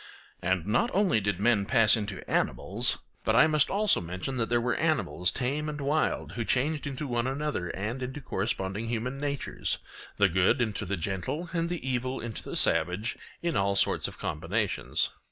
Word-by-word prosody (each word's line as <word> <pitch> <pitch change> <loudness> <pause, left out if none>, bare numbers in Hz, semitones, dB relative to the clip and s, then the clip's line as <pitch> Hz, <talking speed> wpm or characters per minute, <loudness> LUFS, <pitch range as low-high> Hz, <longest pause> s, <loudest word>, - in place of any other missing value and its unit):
And 90 -1 0
not 120 - +1
only 185 - +3
did 100 -2 -1
men 105 -2 +2
pass 115 -5 +7
into 105 -3 -5
animals, - - +1 0.3
but 110 - +1
I 125 - +7
must 155 -2 +2
also 210 +1 +2
mention 90 +10 -5
that 115 -2 -1
there 120 0 +3
were 120 0 0
animals 90 +5 +1
tame 145 +4 -2
and 150 0 -5
wild 145 +3 0
who 120 - -3
changed 145 +6 0
into 140 +1 -4
one 120 -2 -1
another 140 -8 -2
and 110 +9 -4
into 130 +3 -5
corresponding 100 -3 -3
human 120 +4 -3
natures—the 140 -7 -2
good 95 +8 +2
into 105 -4 -2
the 100 +1 -2
gentle 95 - -3
and 170 -1 0
the 175 -6 -4
evil 130 0 -1
into 115 -2 -5
the - - -7
savage, 90 +7 +5 0.3
in 170 -1 -1
all 100 0 +1
sorts 100 - +1
of - - -10
combinations. 95 +7 -1
120 Hz, 175 wpm, -28 LUFS, 100-140 Hz, 0.3 s, pass